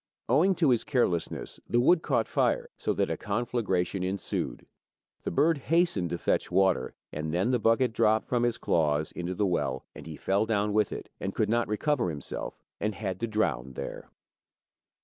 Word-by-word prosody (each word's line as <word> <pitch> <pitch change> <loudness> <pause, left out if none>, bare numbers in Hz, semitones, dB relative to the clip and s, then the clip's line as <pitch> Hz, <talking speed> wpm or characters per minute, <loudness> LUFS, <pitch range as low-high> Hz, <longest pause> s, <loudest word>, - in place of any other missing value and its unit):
Owing 165 +11 +4
to 160 -5 +3
his 120 - +2
carelessness 105 - -1
the 120 - +3
wood 160 +7 +5
caught - - +1
fire, 480 -1 +1
so - - -1
that - - 0
a - - -1
conflagration 105 -4 -1
ensued, 95 +2 -3 0.6
the - - -3
bird 155 - +3
hastened 155 - +1
to 85 - -2
fetch - - 0
water, 95 0 +2 0.2
and 75 +1 -3
then 90 +9 +1
the 125 - +2
bucket 115 +2 +3
dropped 110 -1 +2
from 120 -2 +1
his 120 -1 +1
claws 75 -2 +1
into 90 +1 -4
the 105 - +1
well, 65 -8 -1
and - - -10
he 80 - -6
fell 100 +3 +1
down 105 -1 +1
with 105 -2 +2
it, - - -6
and 95 - -4
could 110 - +1
not 120 +1 +2
recover 120 0 0
himself, 75 -4 -5 0.2
but 105 0 -1
had 95 -4 -4
to 115 - -1
drown 70 - -1
there. - - -6
105 Hz, 185 wpm, -28 LUFS, 90-120 Hz, 0.6 s, wood